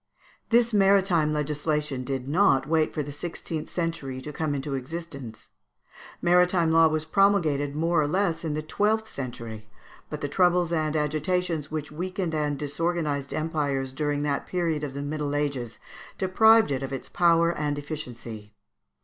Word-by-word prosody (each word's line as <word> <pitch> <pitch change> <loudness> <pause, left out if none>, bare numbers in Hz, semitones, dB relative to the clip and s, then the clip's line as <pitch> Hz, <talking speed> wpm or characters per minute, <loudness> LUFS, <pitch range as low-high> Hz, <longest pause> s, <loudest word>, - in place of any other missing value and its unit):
This 235 0 +3
maritime 195 -6 +4
legislation 150 -2 -1
did 130 0 -4
not 145 -4 +3
wait 160 0 +2
for 150 - -2
the 145 - -7
sixteenth 160 +1 -5
century 165 -7 -3
to 150 +3 -7
come 150 -1 -1
into 140 +1 -3
existence. 135 -4 -6 0.7
Maritime 180 -1 +4
law 165 0 +6
was 155 0 -1
promulgated 160 -7 +2
more 165 +1 +2
or 145 - +1
less 175 0 0
in 155 -2 -2
the 155 - -3
twelfth 215 +7 0
century, 115 - -7 0.4
but 150 0 -6
the 145 - -1
troubles 175 +2 +2
and 155 -1 0
agitations 155 +1 -1
which 155 -1 -4
weakened 180 +1 -3
and 150 -2 0
disorganized 150 -1 -2
empires 145 -4 -1
during 145 0 -1
that 145 -1 -1
period 165 -4 -1
of 140 -2 -4
the 140 - -3
Middle 145 0 -2
Ages, 140 -6 -2 0.4
deprived 220 0 +5
it 135 -1 -1
of 135 - -4
its 135 - -5
power 170 -1 +3
and 145 -1 -1
efficiency. 120 -8 -7
155 Hz, 155 wpm, -26 LUFS, 140-170 Hz, 0.7 s, law